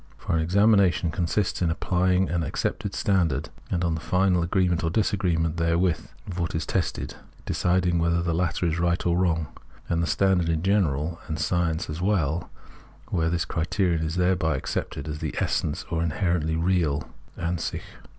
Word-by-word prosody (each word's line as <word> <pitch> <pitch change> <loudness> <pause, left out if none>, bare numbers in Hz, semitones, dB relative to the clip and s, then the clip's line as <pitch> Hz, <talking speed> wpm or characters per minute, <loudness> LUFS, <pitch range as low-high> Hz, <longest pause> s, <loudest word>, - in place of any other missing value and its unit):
For - - -2
an 80 - +2
examination 95 -1 +3
consists 90 +5 -1
in 85 - +2
applying 90 +2 +1
an 85 -1 -1
accepted 80 - -2
standard, 85 -8 +1 0.2
and, 90 -1 0
on 85 -2 +1
the 80 - -3
final 90 +2 +2
agreement 90 0 +1
or 80 - +1
disagreement 85 -5 0
therewith 85 0 +1 0.2
of 90 -1 -6
what 85 -1 -2
is - - -1
tested, - - -2 0.3
deciding 90 -1 +1
whether 85 0 +1
the 85 -1 0
latter 85 +1 0
is 85 0 0
right 85 0 +1
or 85 -1 +2
wrong; 85 -4 +1 0.4
and 85 0 0
bhe - - 0
standard 90 0 +2
in 80 0 0
general, 85 -5 +1
and 80 - -3
science 85 +1 0
as 75 +2 -5
well, 85 -5 0 0.6
were 80 -3 +1
this 85 0 0
the - - -9
criterion, 85 0 +1
is 80 - -3
thereby 90 -5 +2
accepted 70 +2 -4
as 75 0 -4
the - - -4
essence 75 - -1
or 80 -1 0
inherently 85 -1 0
real 80 -4 +1 0.3
(Ansich). 85 0 -2
85 Hz, 170 wpm, -26 LUFS, 80-90 Hz, 0.6 s, examination